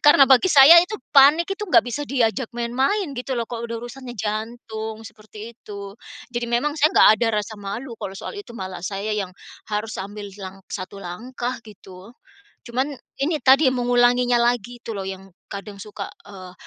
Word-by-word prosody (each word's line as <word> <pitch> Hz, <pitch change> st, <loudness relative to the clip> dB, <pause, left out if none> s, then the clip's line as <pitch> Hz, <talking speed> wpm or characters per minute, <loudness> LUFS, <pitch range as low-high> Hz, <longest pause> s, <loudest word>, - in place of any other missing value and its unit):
karena 290 Hz, -2 st, +8 dB
bagi 265 Hz, +7 st, +6 dB
saya 295 Hz, +4 st, +9 dB
itu 390 Hz, +4 st, -5 dB, 0.2 s
panik 290 Hz, +4 st, +7 dB
itu 405 Hz, -, -6 dB
enggak -, -, +5 dB
bisa 245 Hz, +4 st, -4 dB
diajak 250 Hz, -2 st, 0 dB
main-main 270 Hz, -, 0 dB
gitu 255 Hz, +1 st, -3 dB
loh 235 Hz, -, -1 dB
kalau 235 Hz, -1 st, -5 dB
udah 230 Hz, 0 st, -5 dB
urusannya 245 Hz, 0 st, -9 dB
jantung, 220 Hz, +1 st, -5 dB
seperti 215 Hz, +2 st, -11 dB
itu. 200 Hz, -3 st, -9 dB, 0.4 s
Jadi 240 Hz, 0 st, -2 dB
memang 255 Hz, +6 st, 0 dB
saya 305 Hz, +3 st, +4 dB
enggak -, -, +7 dB
ada 235 Hz, -, +1 dB, 0.2 s
rasa 220 Hz, +1 st, -9 dB
malu 225 Hz, +6 st, -6 dB
kalau 195 Hz, -, -6 dB
soal -, -, -7 dB
itu 400 Hz, -12 st, -10 dB
malah 185 Hz, -2 st, -6 dB
saya 200 Hz, +2 st, -3 dB
yang 195 Hz, -3 st, -3 dB, 0.4 s
harus 215 Hz, +1 st, -3 dB
ambil 205 Hz, +1 st, -7 dB
lang 190 Hz, 0 st, -9 dB
1 190 Hz, +1 st, -6 dB
langkah 240 Hz, +8 st, -5 dB
gitu, 195 Hz, 0 st, -14 dB, 0.5 s
cuman 260 Hz, +5 st, -2 dB, 0.3 s
ini 315 Hz, +2 st, +1 dB
tadi 270 Hz, +2 st, +6 dB
mengulanginya 245 Hz, 0 st, +3 dB
lagi 240 Hz, 0 st, 0 dB
itu 225 Hz, -, -6 dB
loh 195 Hz, -, -4 dB
yang 190 Hz, 0 st, -7 dB, 0.2 s
kadang 200 Hz, 0 st, -7 dB
suka, 205 Hz, -1 st, -7 dB, 0.2 s
eee, 185 Hz, -3 st, -11 dB
235 Hz, 175 wpm, -22 LUFS, 205-260 Hz, 0.5 s, saya